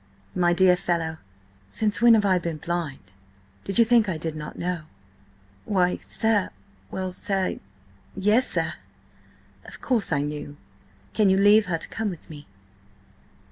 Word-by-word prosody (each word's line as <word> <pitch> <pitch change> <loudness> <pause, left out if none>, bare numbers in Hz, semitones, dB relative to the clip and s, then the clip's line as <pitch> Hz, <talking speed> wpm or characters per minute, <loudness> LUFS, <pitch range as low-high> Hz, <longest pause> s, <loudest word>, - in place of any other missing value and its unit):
"My 175 -1 +2
dear 180 +1 +5
fellow, 165 -3 -2 0.5
since 215 - 0
when 235 -1 +7
have 210 -2 +2
I 185 -2 +3
been 170 -2 -4
blind? 155 - -4 0.5
Did 195 - -2
you 230 - +7
think 230 -3 +4
I 170 - -2
did 160 0 -4
not 150 -1 -7
know?" 175 -2 -3 0.8
"Why, 180 -3 +1
sir–well, 185 - -2
sir–yes, 190 - -2
sir!" - - -1 0.9
"Of - - -12
course 235 -10 0
I 145 -2 +1
knew! 145 0 -6 0.6
Can 210 -3 +3
you 190 - +4
leave 205 +1 +5
her 170 -2 0
to - - -6
come 220 -1 -2
with 175 -3 -9
me?" 145 -1 -11
180 Hz, 140 wpm, -25 LUFS, 155-205 Hz, 0.9 s, when